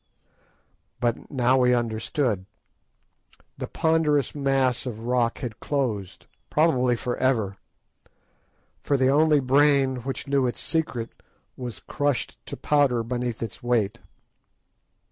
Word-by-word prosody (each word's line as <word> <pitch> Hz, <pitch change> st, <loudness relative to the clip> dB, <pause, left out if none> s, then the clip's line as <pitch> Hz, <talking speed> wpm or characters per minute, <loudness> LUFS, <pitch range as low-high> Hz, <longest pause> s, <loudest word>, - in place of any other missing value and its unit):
But 120 Hz, -1 st, -1 dB
now 130 Hz, -1 st, +2 dB
we 125 Hz, -1 st, +4 dB
understood. 110 Hz, -2 st, -1 dB, 1.1 s
The -, -, -3 dB
ponderous 155 Hz, -4 st, +1 dB
mass 135 Hz, -3 st, +1 dB
of 115 Hz, -2 st, -6 dB
rock 120 Hz, -1 st, +1 dB
had 120 Hz, -5 st, -5 dB
closed, 115 Hz, -10 st, -2 dB, 0.2 s
probably 130 Hz, -6 st, +3 dB
for 120 Hz, +1 st, -3 dB
ever, 110 Hz, -7 st, +1 dB, 1.2 s
for 140 Hz, -, +1 dB
the 130 Hz, 0 st, +3 dB
only 150 Hz, +1 st, +4 dB
brain 135 Hz, 0 st, +3 dB
which 130 Hz, +3 st, -5 dB
knew 140 Hz, -2 st, +2 dB
its 120 Hz, -, -3 dB
secret 135 Hz, -8 st, -2 dB, 0.4 s
was 125 Hz, -3 st, -7 dB
crushed 145 Hz, -3 st, -2 dB
to -, -, -5 dB
powder 140 Hz, -6 st, +2 dB
beneath 120 Hz, -1 st, -3 dB
its 115 Hz, -, -7 dB
weight. 120 Hz, -2 st, 0 dB
125 Hz, 115 wpm, -25 LUFS, 120-140 Hz, 1.2 s, we